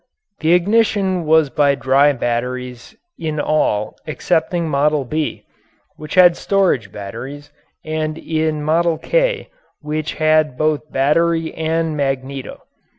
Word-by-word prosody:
The 160 +2 +3
ignition 190 -2 +1
was 160 -3 +4
by 140 +1 +3
dry 140 +2 +3
batteries 125 - -4 0.2
in 155 -2 -3
all 125 -9 0
excepting 170 +2 -1
"Model 145 -1 +1
B," 155 +4 -3 0.5
which 155 -1 -7
had 180 -2 +7
storage 180 - 0
batteries, 135 +9 -8 0.3
and 155 0 -2
in 155 -2 -2
"Model 165 +2 +1
K" - - 0 0.3
which 155 0 -4
had 155 -3 +2
both 155 -1 -1
battery 165 +4 +1
and 160 0 -1
magneto. 135 -1 -3
155 Hz, 115 wpm, -18 LUFS, 140-165 Hz, 0.5 s, had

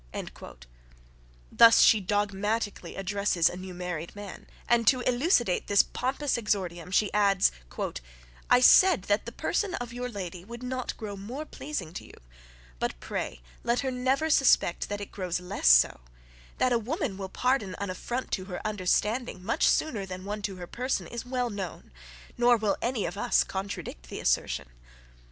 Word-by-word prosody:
Thus 230 -1 +7
she 220 - +6
dogmatically 205 +2 -2
addresses 195 -3 +1
a - - -1
new 185 0 -8
married 175 -1 -5
man; 205 -2 -9 0.2
and 235 -1 +2
to 255 0 +5
elucidate 245 - +1
this 200 -1 +5
pompous 265 0 -2
exordium, 180 -6 -2
she 200 +2 +1
adds, 200 -2 +4 1.0
"I 250 - +6
said 365 - +7
that 205 +1 0
the - - -4
person 405 -4 -1
of 240 -1 -6
your 250 +1 -4
lady 185 -5 -6
would 235 +4 -9
not 255 0 -4
grow 210 -2 -6
more 240 +10 -6
pleasing 295 - -6
to - - -6
you, - - -14 0.6
but - - -2
pray - - -4 0.2
let 235 +1 +1
her 265 -1 -2
never 265 +5 0
suspect 265 -11 +3
that 205 0 -3
it 200 - -7
grows 180 -3 -3
less 180 - -2
so: - - +6 0.6
that 255 - +2
a 235 - +3
woman 265 - -3
will 190 -1 -6
pardon 240 -5 0
an 200 -2 -3
affront 245 +7 -4
to 185 - -2
her 180 -2 -6
understanding 210 +1 0
much 230 - +2
sooner 215 -11 +1
than 185 0 -7
one 210 +1 -4
to 195 -1 -3
her 180 -1 -7
person, 250 +8 -2
is 235 +1 -7
well 250 -2 -1
known; 190 -4 -6 0.5
nor 240 0 +5
will 215 -2 0
any 235 -3 -1
of 175 +4 -5
us - - +3
contradict 190 - -6
the - - -6
assertion. 70 - 0
205 Hz, 165 wpm, -28 LUFS, 185-245 Hz, 1.0 s, Thus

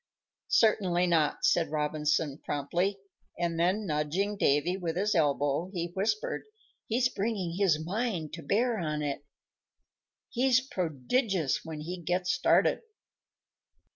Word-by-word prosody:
"Certainly 185 -6 +3
not," 160 -4 +1
said 165 -3 +3
Robinson, 150 -1 0
promptly; 175 +8 -1 0.4
then, 175 +4 0
nudging 165 +6 -1
Davy 160 0 +2
with 170 -4 -3
his 205 +4 +1
elbow, 145 0 +1
he 170 0 -2
whispered, 215 +3 -1 0.4
"He's 245 +3 +2
bringing 200 -6 -2
his 160 -6 +2
mind 190 -5 -2
to 165 - -6
bear 220 - +1
on 150 -3 -2
it. 145 -1 -3 1.1
He's 255 0 +3
prodigious 185 - -1
when 160 -2 -7
he 175 +3 -6
gets 180 +2 0
started!" 255 - +3
175 Hz, 115 wpm, -29 LUFS, 155-205 Hz, 1.1 s, Certainly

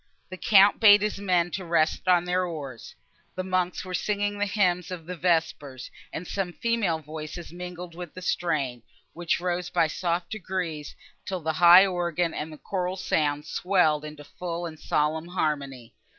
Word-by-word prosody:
The 185 - -6
Count 200 +1 +5
bade 205 -2 +7
his 210 -1 -2
men 180 -3 +1
rest 170 -1 0
on 175 -1 +4
their 180 +1 +1
oars. 145 -9 -7 0.4
The 185 - -2
monks 185 -1 -1
were 185 - -7
singing 205 +1 -1
the 205 - +1
hymn 180 -4 +1
of 180 -3 -7
vespers, 165 -7 -1 0.2
and 180 - -5
some 190 -3 -3
female 230 -8 0
voices 155 +2 -8
mingled 180 -1 -7
with 175 -1 -9
the 185 - -8
strain, 140 -10 -1 0.3
which 170 0 -1
rose 180 0 -2
by 165 - +2
soft 170 +2 -2
degrees, 180 -7 -4 0.3
till 185 -3 -4
the 160 0 -1
high 175 +3 +8
organ 175 -2 -1
and 155 +1 -5
the 155 - -10
choral 185 +2 -3
sounds 150 -5 0
swelled 180 -5 +2
into 150 -1 -9
full 170 +3 -5
and 160 -2 -8
solemn 155 +2 0
harmony. 140 -9 -3
175 Hz, 165 wpm, -26 LUFS, 155-185 Hz, 0.4 s, high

